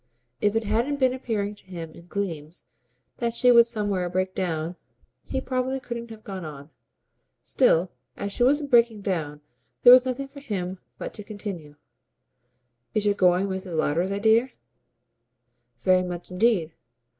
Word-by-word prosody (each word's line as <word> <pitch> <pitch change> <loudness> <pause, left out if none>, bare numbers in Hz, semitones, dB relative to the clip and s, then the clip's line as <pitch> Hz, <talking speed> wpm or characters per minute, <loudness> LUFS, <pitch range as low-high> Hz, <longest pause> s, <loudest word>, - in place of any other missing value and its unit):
If 205 +1 +2
it 225 - +1
hadn't 235 +7 0
been 260 -2 +3
appearing 215 -5 -2
to 205 - -19
him 170 -4 -7
in 170 +2 -15
gleams 170 -5 -5 0.5
that 235 -1 -2
she 250 +1 +5
would 235 -1 +7
somewhere 205 -6 -1
break 185 +1 -1
down, 170 -2 -2 0.5
he 265 - -2
probably 260 0 -2
couldn't 235 -2 -6
have 220 -1 -11
gone 190 -2 -6
on. 145 -1 -9 0.7
Still, 185 -9 +3 0.3
as 200 0 -4
she - - -5
wasn't 285 +3 +3
breaking 235 -3 +4
down 155 -7 -3 0.4
there 245 - +11
was 255 0 +7
nothing 265 +2 -3
for 280 +1 -12
him 190 -8 -4 0.2
but - - -6
to 210 - -5
continue. 200 -8 -7 1.2
"Is 210 -1 +1
your 205 - +4
going 180 -1 +3
Mrs. 190 -3 -4
Lowder's 170 +5 +1
idea?" 220 +5 +3 1.3
"Very 185 0 +4
much 180 0 -6
indeed. 180 -4 +2
200 Hz, 155 wpm, -25 LUFS, 180-235 Hz, 1.3 s, there